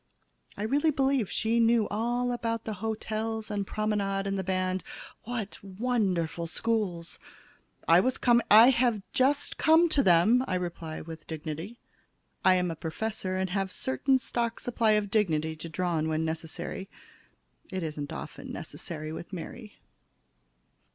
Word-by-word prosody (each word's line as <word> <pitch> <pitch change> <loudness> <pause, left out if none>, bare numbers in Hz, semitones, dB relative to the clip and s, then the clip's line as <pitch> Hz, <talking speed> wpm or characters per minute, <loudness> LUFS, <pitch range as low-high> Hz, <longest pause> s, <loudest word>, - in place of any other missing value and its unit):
I 205 - -3
really 285 +8 +2
believe 270 -6 +1
she 225 +1 +1
knew 230 -1 +4
all 240 +3 0
about 230 -2 -2
the 220 - -4
hotels 220 0 -3
and 200 -2 -2
promenade 200 -2 -1
and 195 0 -1
the 190 - -2
band. 185 0 -1 0.4
What 225 -5 -5
wonderful 190 -6 -1
schools! 185 -4 -2 0.7
"I 165 +1 +7
was 255 +7 +1
coming 240 -1 +4
I 225 +5 +9
have 235 -5 +1
just 275 +3 +1
come 320 +2 +6
to 290 - +3
them," 210 +5 +5
I 185 - 0
reply 170 -3 -4
with 160 -1 -9
dignity. 160 +7 -6 0.7
I 185 0 +6
am 180 -1 +1
a - - -4
professor 185 +4 -3
and 190 -1 -1
have 195 0 0
a - - -8
certain 260 - +1
stock 235 -2 -2
supply 230 -3 +2
of 210 -2 0
dignity 160 -8 +1
to 165 +2 -7
draw 175 +2 -1
on 155 0 0
when 160 0 0
necessary. 165 +4 -5 0.8
It 185 -2 -3
isn't 150 -2 -4
often - - -7
necessary 155 -2 -6
with 170 +3 -7
Mary. 210 +5 -8
200 Hz, 150 wpm, -29 LUFS, 170-230 Hz, 0.8 s, I